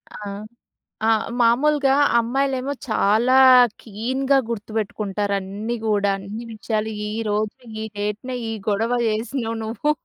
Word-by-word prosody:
ఆ! - - -7 0.9
ఆహ్, 225 -1 +3 0.2
మామూలుగా 270 +4 +3 0.2
అమ్మాయిలేమో 265 +3 0 0.2
చాలా 220 +4 +3 0.5
కీన్‌గా 260 +6 0
గుర్తుపెట్టుకుంటారు. 210 -2 -3
అన్నీ 205 +5 -4
కూడా 205 -2 +2
అన్ని 200 +4 -7
విషయాలు 220 0 -2 0.2
ఈరోజు 215 -1 -2 0.3
ఈ - - -3
డేట్‌నే 210 +5 -3 0.2
ఈ - - -3 0.2
గొడవ 220 +3 +1 0.2
చేసినావు 225 +1 -2
నువ్వు 225 +7 -1
220 Hz, 110 wpm, -22 LUFS, 210-250 Hz, 0.9 s, ఆహ్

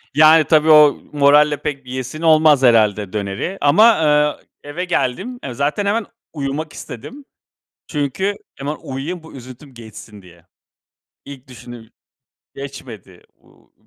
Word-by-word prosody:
Yani, 155 +1 +6
tabii, 155 0 +3
o 150 -2 +6 0.2
moralle 145 +1 +4
pek 140 -3 -5
bir - - -13
yiyesin 130 +4 -6
olmaz 155 -4 +4
herhâlde 105 -5 +2
döneri 100 - -4
ama, 145 +9 +4
aaa, 150 -8 +2 0.2
eve 155 +6 -5
geldim. 190 - -3
Eee, 130 - -6
zaten 145 - -2
hemen 210 +1 -1 0.3
uyumak 150 +1 -5
istedim. 235 - -10 0.6
Çünkü 160 +7 -2 0.2
hemen 145 +2 -5
uyuyayım, 150 +6 -6
bu 160 - -14
üzüntüm 130 +1 -13
geçsin 110 -2 -13
diye. 85 -2 -19 0.8
İlk 140 -1 -12
düşündüğüm. 120 -2 -12 0.7
Geçmedi, 115 -9 -11
uuu, - - -28
145 Hz, 130 wpm, -18 LUFS, 125-155 Hz, 0.8 s, Yani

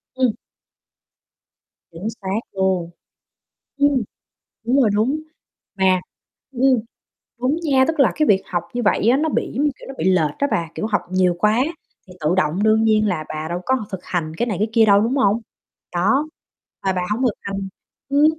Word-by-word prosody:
Ừm. 255 -3 +2 1.6
Chính 170 +6 -6
xác 195 +3 -1
luôn. 190 -3 0 0.9
Ừm, 285 -3 +3 0.6
đúng 245 - +2
rồi, 220 - +4
đúng. 250 +9 +1 0.6
Mà 185 -1 +3 0.5
ừm, 255 -1 +3 0.6
đúng 265 +5 +1
nha, 270 -4 +4
tức 320 -2 0
là 275 - +5
cái 305 -1 +1
việc 195 -2 +4
học 175 -2 -2
như 245 - -1
vậy 210 +1 +2
á 250 - +5
nó 315 +2 0
bị, - - -1
giống 280 - +1
như 295 - +3
kiểu, - - -12
nó 270 - -7
bị - - -2
lệch 165 -6 +2
á 280 - +2
bà, 165 -1 0
kiểu, - - -2
học 215 -2 +1
nhiều 185 -1 +2
quá 215 +3 +3 0.5
thì 180 - -13
tự 155 +4 +1
động 185 +2 +1
đương 220 +1 +4
nhiên 215 -1 +3
là 160 -5 -2
bà 155 +1 -4
đâu 175 +1 -3
có 260 -4 +1
thực 190 - -5
hành 160 -3 -2
cái 240 - 0
này 210 -6 -2
cái 215 +3 +1
kia 225 -1 +5
đâu, 200 -1 +5
đúng 235 +6 0
hông? 230 -3 +3 0.5
Đó, 245 - +2 0.6
mà 190 - +2
bà 180 - -1
hông 225 +5 0
thực 240 - +2
hành 195 0 -4 0.4
ừm, 285 +2 +4
215 Hz, 195 wpm, -21 LUFS, 185-260 Hz, 1.6 s, là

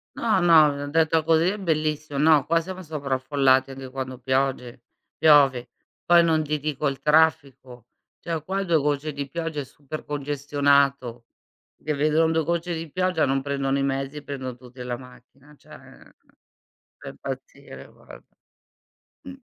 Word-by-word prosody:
No, 215 -5 +1
no, 150 -4 +4
detto 160 +1 +2
così 165 +1 +3
è 210 - -5
bellissimo. 155 -5 -2
No 150 -2 +4
qua 165 +1 +2
siamo 185 +2 -7
sovraffollati 135 -3 0
anche 135 -1 -9
quando 130 -1 -6
pioge 130 -2 -2 0.4
piove. 140 -5 +4 0.3
Poi 175 0 +5
non 160 -2 +2
ti 150 0 -2
dico 150 0 -2
il 135 -1 -3
traffico, 140 -6 +1 0.3
cioè 165 -3 -4
qua 190 +4 -2
2 170 -2 +1
gocce 150 +1 -1
di 140 0 -5
pioggia 165 -1 -4
è - - -5
super 145 +3 -9
congestionato, 140 -3 0 0.6
che 155 - -2
vedono 155 +3 +2
2 160 0 +1
gocce 170 +2 -2
di 160 -1 -7
pioggia, 180 -2 0
non 135 0 0
prendono 140 0 -1
i 135 - 0
mezzi, 135 +2 -3
prendono 130 -3 -7
tutti 125 0 -14
la 125 -1 -4
macchina, 130 +3 -17
cioè - - -25 1.3
da - - -10
impazzire - - -9
guarda. - - -16 1.0
Mh 270 - -7
145 Hz, 150 wpm, -24 LUFS, 135-160 Hz, 1.3 s, Poi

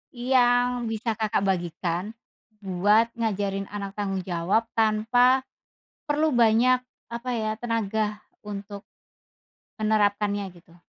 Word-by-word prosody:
yang 245 -1 +2
bisa 225 +1 -2
Kakak 215 -2 -1
bagikan, 180 +2 -2 0.5
buat 205 +5 +3
ngajarin 200 -3 -1
anak 200 -1 -6
tanggung 195 -2 -2
jawab 180 +5 0 0.2
tanpa, 245 +4 +3 0.7
perlu 300 +1 +2
banyak 240 +2 +4 0.3
apa 235 +2 -5
ya, 215 0 -1
tenaga 220 -2 -2 0.2
untuk, 205 -1 -7 1.0
menerapkannya 205 -2 +1
gitu? 170 0 -20
215 Hz, 100 wpm, -25 LUFS, 200-235 Hz, 1.0 s, banyak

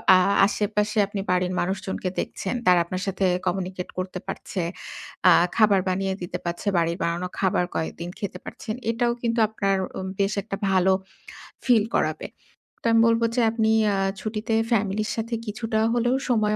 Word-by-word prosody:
আ - - +7 0.3
আশেপাশে 210 +1 -1
আপনি 205 0 -5
বাড়ির 180 0 +1
মানুষজনকে 190 0 -2
দেখছেন। 195 - -3
তারা 180 -1 +6
আপনার 185 +2 -4
সাথে 195 0 0 0.2
কমিউনিকেট 185 0 -2
করতে 185 0 -3
পারছে। 190 - -4 0.7
আ - - +8 0.3
খাবার 210 -3 +5
বানিয়ে 190 +1 0
দিতে 175 - -4
পাচ্ছে, 175 +4 -4
বাড়ির 170 0 +1
বানানো 170 +2 -1
খাবার 185 -2 +2
কয়েকদিন 170 +2 -3
খেতে 190 -3 -4
পারছেন। 215 - -6 0.2
এটাও 235 +1 +1
কিন্তু 235 -1 0
আপনার 195 -2 0 0.2
উম 190 - -4
বেশ 200 0 +2
একটা 200 -1 -5
ভালো 190 0 +4 0.7
ফিল 235 -4 +5
করাবে। - - 0 0.5
তো - - -19
আমি 230 0 +5
বলব 230 0 +3
যে 250 - +3
আপনি 220 -1 +1 0.2
আ - - +1 0.3
ছুটিতে 215 +1 -3 0.2
ফ্যামিলির 215 -1 +1
সাথে 230 +1 -4
কিছুটা 220 0 -2
হলেও 240 +1 +2
সময় 215 -3 +2
200 Hz, 160 wpm, -24 LUFS, 185-220 Hz, 0.7 s, আ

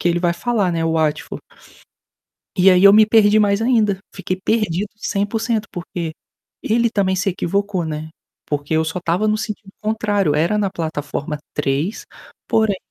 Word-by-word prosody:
que - - +1
ele 175 0 +1
vai 175 -1 +2
falar, 210 0 0
né, 165 -1 -1
Watfor". 160 -2 -1 1.2
E 185 +1 +6
aí 180 +1 +4
eu 200 0 +9
me 215 +1 +7
perdi 215 -1 +4
mais 200 0 +2
ainda, 220 -5 +2
fiquei 185 -1 -4
perdido 210 -3 0
100%, 215 +2 -1
porque 170 -2 -5 0.5
ele 235 +1 +1
também 195 -3 +1
se 195 +1 0
equivocou, 190 0 -1
né, 155 0 -5 0.4
porque 145 +1 -3
eu 160 0 +3
só 160 +3 -3
estava 180 +5 0
no 215 0 +2
sentido 215 -2 -6
contrário, 205 -7 0
era 170 +7 +1
na 205 -2 +1
plataforma 150 -3 -4 0.2
3, 150 +7 -2 0.4
porém 220 -3 +2
195 Hz, 160 wpm, -19 LUFS, 165-215 Hz, 1.2 s, eu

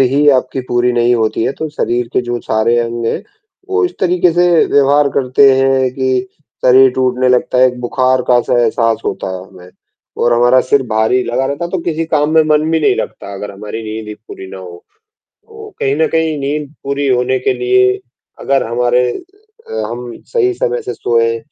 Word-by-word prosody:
ही 140 +3 +3
आपकी 130 0 0
पूरी 120 0 +1
नहीं 120 0 +2
होती 110 -1 0
है, - - 0
तो 160 +2 -5
शरीर 120 -5 -2
के - - +2
जो 120 0 -3
सारे 110 +2 0
अंग 115 0 -2
हैं, - - -2 0.5
वो 395 0 +1
इस 360 - -2
तरीक़े 180 -1 +2
से 175 +2 +2 0.3
व्यवहार 140 +1 +4
करते 135 +1 +4
हैं 135 -1 +2
कि 130 -1 0 0.4
शरीर 130 +1 +6
टूटने 130 0 +1
लगता 125 0 +1
है, 130 - +6
एक 125 -1 -3
बुखार 130 +1 +1
का 125 - +5
एहसा 120 0 +1
एहसास 115 0 +1
होता - - -3
है 90 - -9
हमें 90 0 -15 0.5
और 120 - +3
हमारा 120 +2 +4
सिर 135 +2 +1
भारी 110 +4 +2
लगा 130 +3 -1
रहता 140 +4 -3
है 170 - -6
तो 190 - -2
किसी 165 -1 -2
काम 150 -1 +1
में 160 - +6
मन 155 +1 +2
भी 165 0 +1
नहीं 150 - +3
लगता 100 - -6
अगर 105 +1 -6
हमारी 105 +3 -7
नींद 110 0 -6
ही 105 - -6
पूरी 105 -3 -11
ना 95 - -8
हो 90 -2 -11 0.6
तो 440 -1 -12
कहीं 135 +1 0
न 160 - +3
कहीं 160 -2 -1
नींद 145 +1 -4
पूरी 140 +1 -2
होने 130 0 +1
के 130 - 0
लिए 125 0 +2 0.4
अगर 135 -1 0
हमारे 125 +1 +1 0.6
अ, - - -7 0.2
हम 120 +1 -6 0.2
सही 400 -6 +2
समय 475 +3 -2
से 415 - -5
सोए 115 -1 0
130 Hz, 200 wpm, -14 LUFS, 120-145 Hz, 0.6 s, शरीर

